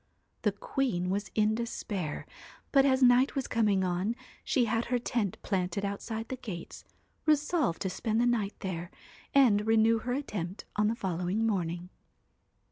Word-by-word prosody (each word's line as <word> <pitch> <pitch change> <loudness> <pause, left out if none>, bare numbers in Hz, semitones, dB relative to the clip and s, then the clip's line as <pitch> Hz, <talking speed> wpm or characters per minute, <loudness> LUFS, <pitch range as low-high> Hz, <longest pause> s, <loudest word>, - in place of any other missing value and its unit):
'The 210 -3 +1
queen 195 -5 -1
was 200 0 -2
in 215 0 +3
despair, 205 -8 -3 0.5
but 275 -1 +5
as 260 -1 +3
night 250 +3 +5
was 270 -2 -1
coming 210 -4 +2
on 185 +5 0 0.3
she 250 -3 +2
had 230 +1 0
her 245 - +1
tent 230 -5 -1
planted 190 0 -1
outside 220 +3 -4
the 260 - -3
gates, 190 -9 -7 0.4
resolved 300 - +2
to - - 0
spend 220 +4 -1
the 240 - +3
night 225 -4 +1
there, 175 -3 -4 0.5
and 220 -6 +5
renew 225 0 +4
her 245 +2 -2
attempt 205 -9 -4
on 210 0 +3
the 225 - +1
following 185 +2 -1
morning. 180 -4 -1
215 Hz, 155 wpm, -30 LUFS, 190-240 Hz, 0.5 s, but